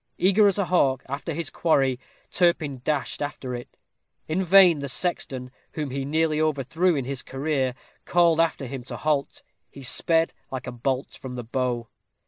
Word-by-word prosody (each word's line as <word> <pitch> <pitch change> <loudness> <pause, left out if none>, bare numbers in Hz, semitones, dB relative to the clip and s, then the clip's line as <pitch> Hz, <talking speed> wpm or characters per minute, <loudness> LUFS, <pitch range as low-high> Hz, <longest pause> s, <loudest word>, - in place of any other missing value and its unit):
Eager 200 +3 +5
as 200 - +2
a 200 - +1
hawk 135 -8 +2
after 140 +2 -4
his 170 - -2
quarry, 135 -6 +2 0.3
Turpin 160 -7 +1
dashed 145 -1 -2
after 140 -3 -4
it. 120 0 -8 0.5
In 175 +5 0
vain 180 -3 +7
the 140 -1 -4
sexton, 130 -6 -2 0.2
whom 150 -4 -3
he 135 +1 -3
nearly 155 +1 +1
overthrew 155 +4 +1
in 135 -3 -2
his 135 -1 -3
career, 135 -2 -1 0.3
called 170 -2 +3
after 160 -4 +1
him 130 0 -6
to - - -6
halt. 150 -2 -1 0.3
He 140 - -12
sped 165 +5 +2 0.2
like 130 -1 -5
a 125 - -5
bolt 130 +2 -2
from 130 -1 -8
the 120 - -5
bow. 120 -1 -2
140 Hz, 170 wpm, -25 LUFS, 130-165 Hz, 0.5 s, vain